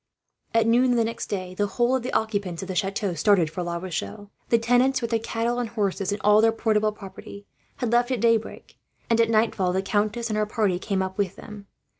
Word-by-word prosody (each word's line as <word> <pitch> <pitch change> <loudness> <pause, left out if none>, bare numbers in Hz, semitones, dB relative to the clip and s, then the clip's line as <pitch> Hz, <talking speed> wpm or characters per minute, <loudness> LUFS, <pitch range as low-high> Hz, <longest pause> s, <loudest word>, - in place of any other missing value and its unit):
At 225 -1 +4
noon 245 +2 +3
the 230 - +3
next 230 +1 -4
day, 185 -2 -4
the 205 +2 0
whole 240 +4 +1
of 260 - -1
the 250 - -4
occupants 200 -6 -1
of - - -7
the 190 - -4
chateau 195 +1 -1
started 170 -1 +2
for 180 - -4
La 170 -1 -3
Rochelle. 180 - -6 0.2
The 235 - +5
tenants, 245 +3 +2
with 235 -1 -4
their 230 - +2
cattle 230 +2 -2
and 240 -2 -2
horses 200 -3 -1
and 205 - -2
all 210 +1 +5
their 225 0 +4
portable 215 -1 +1
property, 200 0 -11 0.3
had 245 -4 -3
left 240 +1 +3
at 255 -3 -1
daybreak; 230 0 -1 0.3
and 230 0 +4
at 230 - +2
nightfall 215 -5 +1
the 190 +1 0
countess 215 +3 -1
and 215 - -1
her 210 0 0
party 205 -5 0
came 190 -1 -1
up 190 +1 -6
with 195 -3 -1
them. 210 -2 -11
215 Hz, 225 wpm, -25 LUFS, 195-230 Hz, 0.3 s, The